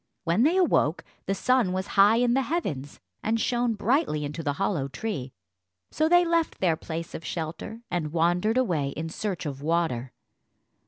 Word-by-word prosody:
When 175 +4 +2
they 320 +8 +4
awoke 245 - +2 0.2
the 195 - +1
sun 240 -3 +2
was 190 0 -2
high 205 +2 +6
in 240 0 +3
the 270 - +3
heavens, 195 - -3 0.2
and 225 +1 0
shone 240 0 +1
brightly 215 - +1
into 150 +3 -5
the 145 -3 -1
hollow 170 -5 -1
tree, 140 - -4 0.6
so 315 +1 +1
they 350 +1 +6
left 335 -1 0
their 175 -4 +2
place 165 +1 -6
of 160 - -6
shelter 170 +9 -5
and 165 -4 -1
wandered 175 +7 +2
away 160 - 0
in 160 +1 -3
search 190 0 -4
of 140 -2 -5
water. 150 -6 0
180 Hz, 170 wpm, -26 LUFS, 155-240 Hz, 0.6 s, high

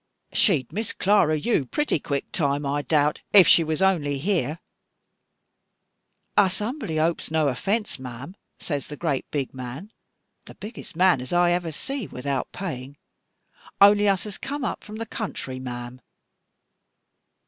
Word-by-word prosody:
She'd 150 - +2
Miss 215 +3 -2
Clara 190 -6 +3
you, 155 - 0
pretty 295 - 0
quick 140 0 -3
time, 145 -3 0
I 145 +1 0
doubt, 150 +2 +1
if 195 -3 +9
she 165 - +7
was 160 +3 -1
only 150 -7 +2
here.' 160 -2 0 1.8
'Us 190 -2 +4
humbly 215 - -3
hopes 165 +2 0
no 155 -2 +2
offence, 200 - -1
ma'am,' 130 +7 -8 0.2
says 145 -4 -4
the 150 - -8
great 150 -5 -2
big 140 -3 -3
man, 130 - -7 0.6
the - - -10
biggest 210 -5 -9
man 180 -6 +4
as 130 - -8
ever 175 0 +2
I - - -1
see 255 - -4
without 135 +1 -3
paying, 140 -7 -6 0.8
'only 205 +1 +7
us 195 -2 +1
has 210 -2 -7
come 285 0 -4
up - - -3
from 215 - -9
the 225 +1 -4
country, 175 - -5
ma'am. 125 0 -7
160 Hz, 150 wpm, -25 LUFS, 140-200 Hz, 1.8 s, if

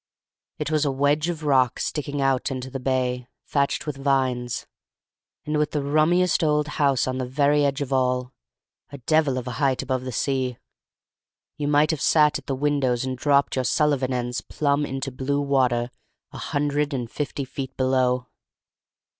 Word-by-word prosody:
It - - -3
was 155 -1 +2
a 145 - +1
wedge 145 +4 +1
of 165 -2 -4
rock 130 -4 +2
sticking 145 -1 -2
out 135 -1 +1
into 130 -1 -5
the 135 - -4
bay, 125 -1 -1 0.2
thatched 140 -1 0
with 150 -3 -4
vines, 130 -3 0 0.8
and 150 0 0
with 150 - 0
the 150 -2 0
rummiest 165 +5 +2
old 150 -1 +2
house 140 -3 +2
on 130 0 -2
the 130 - -2
very 145 +3 +2
edge 140 0 0
of 140 -1 -2
all, 125 -1 0 0.6
a 140 - -7
devil 140 0 +1
of 125 - -4
a - - -3
height 135 -2 +2
above 130 -1 -1
the 130 - -4
sea: 130 0 -1 1.0
you 145 - -3
might 150 +2 +3
have 155 -3 -3
sat 150 -2 +4
at - - -19
the 135 - -1
windows 135 -3 0
and 130 0 -2
dropped 140 +2 +2
your 130 - +1
Sullivan 140 -1 +1
ends 125 -1 -2
plumb 145 0 0
into 135 0 -4
blue 135 +3 -1
water 130 -4 +1 0.4
a - - -9
hundred 145 0 -1
and 120 -3 -4
fifty 145 -1 -3
feet 135 0 -7
below. 130 -1 +1
135 Hz, 175 wpm, -24 LUFS, 130-145 Hz, 1.0 s, sat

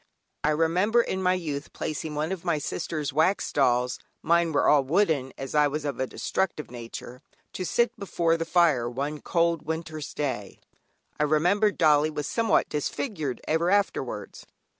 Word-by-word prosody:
I 150 - +3
remember 180 +9 +3
in 190 - -3
my 185 0 +3
youth 150 -5 -5
placing 155 0 -4
one 155 +4 -1
of 190 -3 -4
my 170 -3 +1
sister's 150 -1 -3
wax 160 +7 +1
dolls 125 -2 +2 0.2
(mine 170 0 +3
were 145 - +2
all 145 -2 +5
wooden, 150 -3 +1
as 135 -1 -6
I 150 -1 +4
was 150 +1 -3
of 140 -4 -3
a 130 - 0
destructive 170 -5 -2
nature) 120 +1 -8 0.3
to 185 - -4
sit 235 +7 +1
before 170 -4 +1
the 165 - -1
fire 160 -9 +3
one 140 +4 -4
cold 170 -2 +1
winter's 160 -1 -5
day; 130 -9 -3 0.6
I - - +3
remember 180 +8 +3
dollie 155 -5 +3
was 150 -2 -4
somewhat 230 -1 +2
disfigured 150 - -3
ever 160 +2 +2
afterwards. 200 +1 -1
155 Hz, 160 wpm, -26 LUFS, 145-175 Hz, 0.6 s, all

